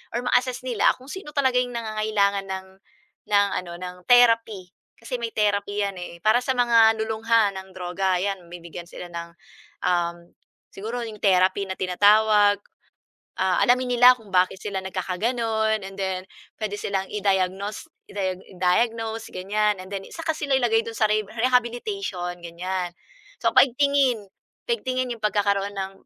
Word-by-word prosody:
or 240 - -1
ma-assess 255 0 +1
nila 245 -5 +3
kung 260 +1 -17
sino 340 -6 -8
talaga 260 -3 +3
'yong 245 -1 -2
nangangailangan 215 -3 0
ng 190 0 -5 0.6
ng 200 0 +5
ano, 175 -1 -9
ng 180 0 -6
therapy. 230 -6 +4 0.2
Kasi 240 +2 -6
may 230 -1 -3
therapy 205 -1 0
‘yan 200 -1 -3
eh, 170 -1 -8
para 220 +3 +4
sa 260 0 0
mga 230 -2 +5
lulong 220 0 -5
ha 225 -3 +4
ng 190 -1 -10
droga, 185 +1 -1
‘yan 195 -3 -3
bibigyan 170 0 -9
sila 175 - -9
ng, 170 0 -6 0.5
um, 175 -1 +1 0.5
siguro 230 +5 -5
'yong 220 -2 -8
therapy 190 0 +3
na 190 - -4
tinatawag. 205 +2 +4 0.8
Ah, 190 -1 +2
alamin 250 0 +3
nila 250 +1 +9
kung 220 -5 -17
bakit 185 +1 +2
sila 200 -2 -3
nagkakaganun, 220 +3 -1
and 195 0 -8
then 190 -1 -2 0.4
puwede 215 -2 -3
silang 195 -1 -2
i-diagnos 195 0 -1 0.2
i-diag 190 -2 -3
i-diagnose 225 +5 0
ganiyan, 210 +3 0
and 185 - -11
then 195 -1 -5
tsaka 330 0 -6
sila 290 -3 -2
ilagay 230 -3 +3
dun 230 - -6
sa - - 0
reheb 215 0 +1
rehabilitation 240 - -1
ganiyan. 175 +1 -4 0.5
So, - - +4
pa-igtingin, 265 -5 +3 0.4
pa-igtingin 255 - -1
'yong 230 -2 -7
pagkakaroon 200 -1 +1
ng, 195 0 -3
205 Hz, 150 wpm, -24 LUFS, 190-235 Hz, 0.8 s, nila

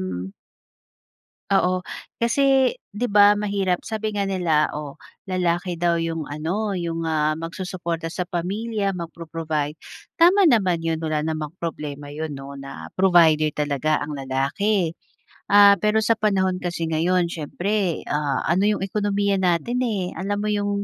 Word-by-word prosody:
um. 95 +1 -5 1.2
Oo. 185 -1 +3 0.4
Kasi, 265 +2 +3 0.2
'di 220 +4 -2
ba 205 0 +5
mahirap 200 -3 0
sabi 220 -1 -2
nga 200 - 0
nila, 170 -6 +2
oh 150 -2 -7 0.3
lalaki 175 -1 -1
daw 175 0 +2
iyong 165 -2 -2
ano, 185 +8 -2
iyong, 165 -2 -3
ah, 155 -1 +1
magsusuporta 170 -1 -4
sa 180 +1 -3
pamilya, 200 +4 -2
mag-pro-provide. 165 -3 -4 0.4
Tama 365 +4 +6
naman 185 -8 +2
iyon 165 -1 -1
wala 155 -2 -1
namang 155 0 -3
problema 145 -3 -5
iyon 155 0 -5
'no 140 +1 -8
na 135 0 -9
provider 160 -5 +4
talaga 150 +1 0
ang 145 -1 -5
lalaki. 160 +8 0 0.6
Ah, 200 0 +7
pero 215 +1 +2
sa 230 0 +2
panahon 190 -3 +1
kasi 175 -1 -3
ngayon, 170 +2 +1
siyempre, 180 +3 -2
ah, 145 -1 0
ano 185 +5 +2
iyong 205 -2 0
ekonomiya 200 -1 0
natin, 185 +7 +1
eh, 190 -5 -2
alam 205 +2 -2
mo 210 - 0
iyong 205 -1 -1
175 Hz, 140 wpm, -23 LUFS, 155-200 Hz, 1.2 s, Ah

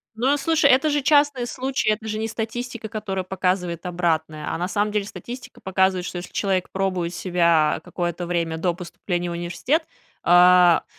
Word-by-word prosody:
Ну, 240 +4 0
а 290 - +3
слушай, 305 0 +3
это 270 +4 +4
же 290 0 +1
частный 285 -3 +3
случай, 260 -2 -1
это 215 +1 -1
же 215 0 -3
не 220 - -1
статистика, 230 +1 -5
которая 210 -4 -4
показывает 180 -2 -2
обратное. 160 -3 -1
А - - -2
на 180 - -1
самом 205 +2 0
деле 205 -1 -1
статистика 245 +4 -9
показывает, 190 -1 +1
что 180 - -5
если 175 +1 -7
человек 190 -3 0
пробует 185 -3 -2
себя, 170 -4 +2
а, - - -6
какое-то 175 0 -4
время 170 -2 -1
до 175 +1 0
поступления 175 0 -4
в - - -4
университет, 175 - -1 0.4
а. 180 0 +6
190 Hz, 180 wpm, -23 LUFS, 175-230 Hz, 0.4 s, а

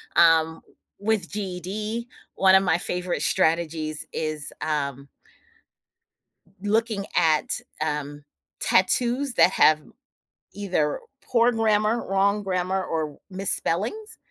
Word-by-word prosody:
Um, 160 -1 +4 0.4
with 205 -3 0
GED, 210 +4 -4 0.3
one 190 0 +5
of 190 - +5
my 170 - +2
favorite 180 0 -2
strategies 160 -2 0
is, 155 -2 -3
um 140 -3 -2 1.5
looking 210 0 0
at, 160 -3 +2 0.2
um, 145 -1 -3 0.4
tattoos 245 +7 +2
that - - +5
have 155 -1 +4 0.7
either 180 -7 -1 0.2
poor 240 0 +2
grammar, 220 0 +1
wrong 200 +2 +2
grammar, 185 0 -1
or 155 -3 -3
misspellings. 200 - -1
185 Hz, 95 wpm, -24 LUFS, 160-210 Hz, 1.5 s, one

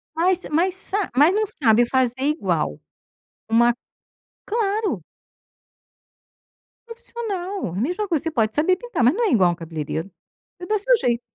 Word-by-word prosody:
Mas 360 +2 +2
mas 355 +4 +1
sa 395 0 -2
mas 295 +7 +5
não 430 +2 +1
sabe 240 - +3
fazer 255 -1 +1
igual. 190 - -1 0.7
Uma 235 +1 +4 0.7
Claro. 430 -1 -1 1.8
Profissional. 410 - -5
Mesma 355 - -1
coisa, 320 -5 0
você 325 - -2
pode 225 -6 0
saber 325 +5 +3
pintar, 480 - -3
mas 245 +4 +5
não 465 +5 0
é - - 0
igual 185 -6 +4
a - - +2
um - - -4
cabeleireiro. 160 +1 -5 0.5
É 355 - -7
do 425 +3 +1
seu - - +4
jeito. 240 - 0
325 Hz, 150 wpm, -22 LUFS, -, 1.8 s, mas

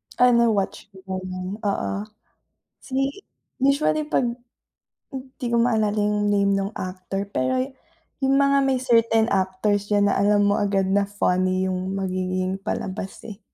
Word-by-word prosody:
Ah 250 0 +5
na-watch 225 -6 +1
ko 190 0 -5
na 185 - -6 0.3
oo. 200 - -1 0.9
Si 270 +7 -2 0.4
usually 280 +3 +2
pag 295 -4 0 1.1
di 250 - -2
ko 235 - +1
maalala 220 -3 +2
yung 210 0 +1
name 200 -1 +2
nung 195 +1 -1
actor 185 +1 -4
pero 260 0 0 0.6
yung 270 0 +3
mga 280 0 +4
may 265 - +2
certain 230 -3 +3
actors 195 +2 0
diyan 205 -1 +3
na - - 0
alam 205 0 +3
mo 205 0 +2
agad 200 -1 +1
na 200 0 +2
funny 185 -2 +1
yung 185 +1 -2
magiging 185 0 -2
palabas 195 -1 -5
eh. 215 -1 -9
205 Hz, 140 wpm, -23 LUFS, 190-235 Hz, 1.1 s, Ah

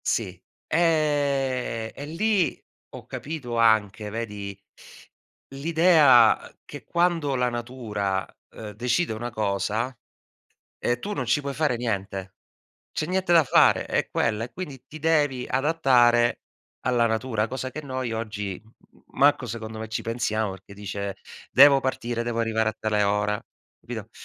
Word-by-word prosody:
Sì, 95 -5 -1 0.2
eh, 140 -8 0
e 145 - -7
lì 190 +3 +1 0.4
ho - - -10
capito 135 -6 -5
anche, 110 -2 +2
vedi, 105 -3 -5 0.9
l'idea, 145 -4 +5
ehm, - - -26
che - - -10
quando 170 -5 +1
la 125 -1 +1
natura, 110 -6 -3 0.2
ehm, 110 -2 -9
decide 125 - 0
una 120 +2 -4
cosa, 110 +3 -1 0.8
ehm, 120 0 0
tu 205 +10 -4
non 130 - -3
ci 125 +5 +2
puoi 140 -1 -4
fare 145 -3 0
niente. 100 -5 -3 0.6
C'è - - -2
niente 185 0 0
da 165 -2 +7
fare, - - +4
è - - -1
quella. 110 +1 0
E 120 - -14
quindi 145 -9 -7
ti 155 +3 -11
devi 145 -5 +1
adattare 130 -5 +3 0.4
alla 120 -2 +2
natura, 110 -1 -1
cosa 130 +1 -5
che 155 - -6
noi 130 -4 -4
oggi, 105 -4 -4
m 110 - -23 0.3
m - - -24 0.2
manco 140 -2 +4
secondo 110 -1 -6
me 110 - -5
ci 110 - -3
pensiamo 110 -2 -1
perché 95 +1 -12
dice: 100 0 -5 0.4
"Devo 140 0 +8
partire, 120 -3 -2
devo 120 -1 -2
arrivare 110 -1 +1
a 110 - -8
tale 105 -1 +1
ora". 105 +1 0 0.4
Capito? - - -7
120 Hz, 145 wpm, -25 LUFS, 110-140 Hz, 0.9 s, Devo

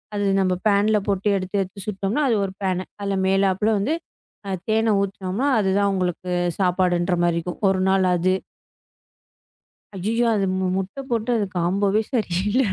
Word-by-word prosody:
அது 205 0 0 0.2
நம்ம 185 -1 +2
ஃபேன்ல 210 0 +3
போட்டு 200 +1 +1
எடுத்து, 185 +1 -5
எடுத்து 190 +1 -6
சுட்டம்னா 200 +6 -1
அது 230 - +3
ஒரு 190 - -6
ஃபேனு. 185 -2 -1 0.2
அதுல 200 -1 -1
மேலாப்ல 195 +2 +2
வந்து 275 +11 0 0.5
அ - - -3 0.2
தேன 220 0 +2
ஊத்துனம்னா, 200 +4 -2
அது 195 -3 +1
தான் 200 0 +2
உங்களுக்குச் 180 -1 -1
சாப்பாடுன்றமாரி 175 -2 +1
இருக்கும். 175 +1 -6
ஒரு 190 -1 +1
நாள் 190 0 +3
அது. 185 +2 +2 1.6
அய்யய்யோ! 220 +6 0
அது 200 -2 +1
மு 190 0 0
முட்டை 195 +7 -4
போட்டு 230 0 -1
அது 205 - 0
காம்போவே 195 +4 +1
சரியில்ல 210 +1 +1
195 Hz, 150 wpm, -22 LUFS, 185-210 Hz, 1.6 s, ஃபேன்ல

